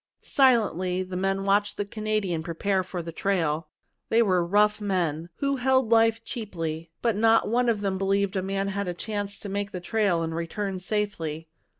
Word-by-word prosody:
Silently 185 - +2
the 185 0 -7
men 195 +1 0
watched 200 +1 +1
the 205 - -1
Canadian 210 -5 -2
prepare 185 +4 -1
for 180 -1 -5
the 165 - -6
trail. 165 -4 0 0.4
They 230 +1 +4
were 185 -4 +2
rough 210 +4 +3
men, 175 -5 -1
who 275 -1 0
held 260 -2 +2
life 225 0 +4
cheaply, 165 -9 -5
but 230 -3 +2
not 225 +2 +4
one 245 +2 +2
of 215 -3 0
them 195 -2 -1
believed 195 0 +1
a 190 - +1
man 195 +1 -1
had 200 0 -2
a 175 - -3
chance 205 0 -4
to - - -8
make 200 +1 -2
the 180 - -4
trail 195 -3 +1
and 165 0 -3
return 185 +4 -3
safely. 170 -6 -3
195 Hz, 185 wpm, -26 LUFS, 180-215 Hz, 0.4 s, They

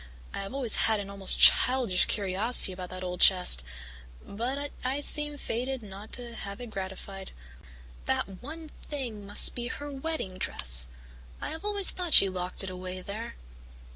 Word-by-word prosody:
I - - -5
have 195 - -8
always 250 -6 +4
had 220 -1 0
an 200 0 -8
almost 195 -1 +3
childish 250 -7 +6
curiosity 200 +2 +2
about 180 -1 -9
that 185 0 -9
old 180 -1 -6
chest, 180 - +5 0.6
but 260 +7 -5
I 260 +3 -2
seem 295 0 +1
fated 255 0 -4
not 200 +1 -12
to 240 -1 -4
have 200 -1 -7
it 245 -2 -9
gratified. 190 0 -8 0.7
That 190 - -3
'one 315 +5 -10
thing' 245 -9 -8
must 205 - +2
be 240 -1 -6
her 290 +3 -8
wedding 270 -10 -5
dress. - - +5 0.5
I - - -6
have 320 +4 -9
always 410 -2 -2
thought 360 - -6
that 330 - -3
she 195 - +5
locked 180 +1 -2
it 190 - -6
away 185 0 -8
there." 215 +5 -8
215 Hz, 170 wpm, -27 LUFS, 190-265 Hz, 0.7 s, childish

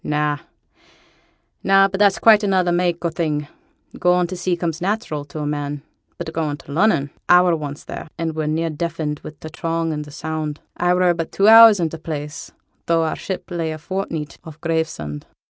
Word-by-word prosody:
'Na, 150 0 0 1.3
na; 195 0 +5
but 195 0 -5
that's 200 -2 +4
quite 215 -2 +6
another 190 -3 +2
mak' 175 -1 0
o' - - +2
thing; 150 -3 -2 0.5
going' 180 0 +3
to 180 +2 -5
sea 175 0 -1
comes 165 -2 -2
natteral 180 -7 -2
to 145 - -10
a 150 - -3
man, 145 -1 -3 0.3
but 160 - -6
goin' 155 -3 -2
to 145 - -13
Lunnon, 160 -4 +2 0.2
I 180 0 +7
were 175 -2 +3
once 145 -2 -6
there, - - -7
and 165 -1 -3
were 155 -1 -2
near 160 +1 0
deafened 155 -2 -3
wi' 155 - -8
t' 155 - -8
throng 165 0 -2
and 150 0 -4
t' 150 - -12
sound. 155 0 -4 0.2
I 175 0 +2
were 180 -1 +3
but 165 -1 -4
two 200 - +2
hours 225 -2 +9
i' 170 - +1
t' 165 - -7
place, 155 0 -6 0.4
though 165 -1 +3
our 160 - -1
ship 190 -1 -6
lay 165 -2 -2
a 155 - -5
fortneet 160 -2 -5
off 160 -2 -11
Gravesend.' 160 - -3
165 Hz, 195 wpm, -21 LUFS, 150-180 Hz, 1.3 s, hours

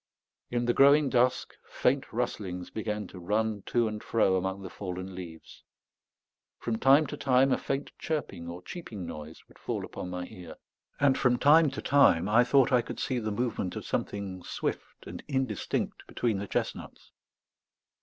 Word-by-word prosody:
In 120 0 -1
the 120 - +2
growing 140 +2 +6
dusk, 125 0 +2 0.2
faint 135 +2 0
rustlings 100 -6 -3
began 105 -1 -3
to 95 - -11
run 105 +3 -1
to 120 -2 +2
and 105 -1 -5
fro 105 -4 +2
among 95 +1 -2
the 95 - -6
fallen 95 -1 -6
leaves; 85 -3 -10 1.0
from 110 -1 -3
time 140 +4 +6
to - - -5
time 130 0 +3
a - - +3
faint 140 +1 -3
chirping 145 - -3
or 85 +1 -7
cheeping 110 - -7
noise 75 0 -9
would - - -21
fall - - -3
upon 90 - -7
my 90 0 -4
ear; 90 -3 -11 0.4
and 140 -2 +3
from 125 -1 +3
time 155 +3 +6
to 135 - -7
time 95 -11 +4
I 110 +4 +5
thought 135 +1 +4
I 125 -2 +5
could - - -7
see 130 -2 -1
the 110 -2 -3
movement 110 -4 -2
of - - -6
something 95 -2 -3
swift - - -5
and - - -8
indistinct 130 -7 -2
between 110 -5 -1
the 100 - -5
chestnuts. - - -4
110 Hz, 170 wpm, -29 LUFS, 95-130 Hz, 1.0 s, growing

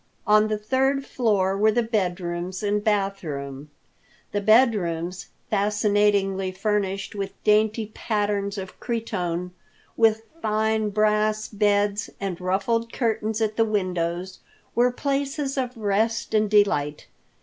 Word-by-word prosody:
On 215 0 +5
the 215 0 -1
third 265 +5 0
floor 200 -8 +1
were 215 +2 +3
the 240 +2 +1
bed 200 -6 -1
rooms 175 +2 -4
and 205 0 0
bath 195 -2 0
room. 140 -1 -6 0.6
The 205 - -1
bed 230 +4 +6
rooms, 175 -1 -3 0.2
fascinatingly 200 -2 +1
furnished 195 0 -1
with 200 -1 -4
dainty 215 +1 +2
patterns 205 -2 -1
of 190 -1 -7
cretonne, 180 -7 -3 0.4
with 225 -1 +3 0.2
fine 220 0 +1
brass 215 +1 +1
beds, 205 0 +1
and 190 -3 -4
ruffled 215 +5 0
curtains 220 -2 -1
at 215 -1 0
the 225 - +5
windows, 185 -3 -2 0.3
were 245 +1 +3
places 275 +1 -2
of 255 -3 -3
rest 220 +2 0
and 215 -1 +3
delight. 155 -9 +2
210 Hz, 125 wpm, -24 LUFS, 190-220 Hz, 0.6 s, bed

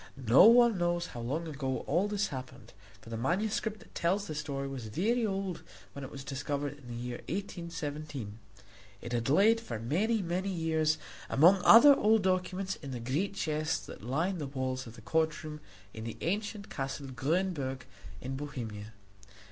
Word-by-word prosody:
No 130 - +6
one 235 -3 +7
knows 175 0 +1
how 120 - -6
long 145 +8 -2
ago 135 -4 -3
all 175 +7 +2
this 205 0 -1
happened, 130 -2 -8 0.3
for 115 - -12
the 115 - -3
manuscript 210 - -1
that - - -18
tells 190 +4 0
the 155 - -5
story 140 -2 -3
was 130 -5 -6
very 220 - +1
old 195 -3 -3 0.3
when 140 - -7
it 135 - -6
was 135 -2 -8
discovered 145 +1 -3
in 130 - -15
the 120 - -6
year 120 +1 -4
1817. 150 - -5 0.6
It 120 +3 -7
had 115 +1 0
lain 205 +10 +5
for 120 - -5
many, 195 - 0
many 180 +3 -1
years 160 -3 +1 0.3
among 180 +7 +6
other 280 +6 +9
old 220 -2 +3
documents 185 +1 0
in 140 - -9
the 125 -2 -4
great 145 +12 -1
chests 155 -2 -1
that - - -10
lined 165 - -1
the 145 - -3
walls 130 -1 -3
of 115 - -11
the 115 - -12
courtroom 155 +2 -1 0.3
in 110 - -7
the 115 -1 -6
ancient 205 +3 -2
Castle 135 +1 -4
Grünberg 135 0 -1 0.4
in 130 +1 -4
Bohemia. 115 -7 -6
155 Hz, 170 wpm, -31 LUFS, 130-190 Hz, 0.6 s, other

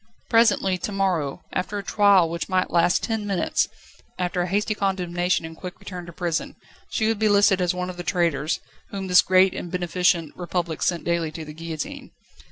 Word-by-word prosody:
Presently, 210 -5 +3
to 205 - -4
morrow, 180 -6 -1
after 190 +3 -2
a 200 - -4
trial 200 -3 +4
which 170 +1 -4
might 185 -1 +1
last 175 +1 +3
ten 220 -2 -2
minutes, 195 -3 +1 0.5
after 180 0 -1
a 175 - -1
hasty 205 +3 0
condemnation 180 -4 0
and 160 0 -8
quick 180 +2 -8
return 180 -2 -8
to - - -8
prison, 170 -1 -3 0.3
she 220 - 0
would 225 -2 0
be 215 -1 +3
listed 200 -2 +4
as 180 0 +1
one 180 0 -2
of 180 - -13
the 175 - -5
traitors, 165 -5 0 0.3
whom 195 -1 -5
this 180 -1 +6
great 185 0 +4
and 175 - -6
beneficent 175 -2 0
Republic 175 -2 -3
sent 175 -2 0
daily 170 -2 0
to 160 -1 -7
the 150 - -9
guillotine. 160 -1 -6
180 Hz, 190 wpm, -24 LUFS, 170-195 Hz, 0.5 s, this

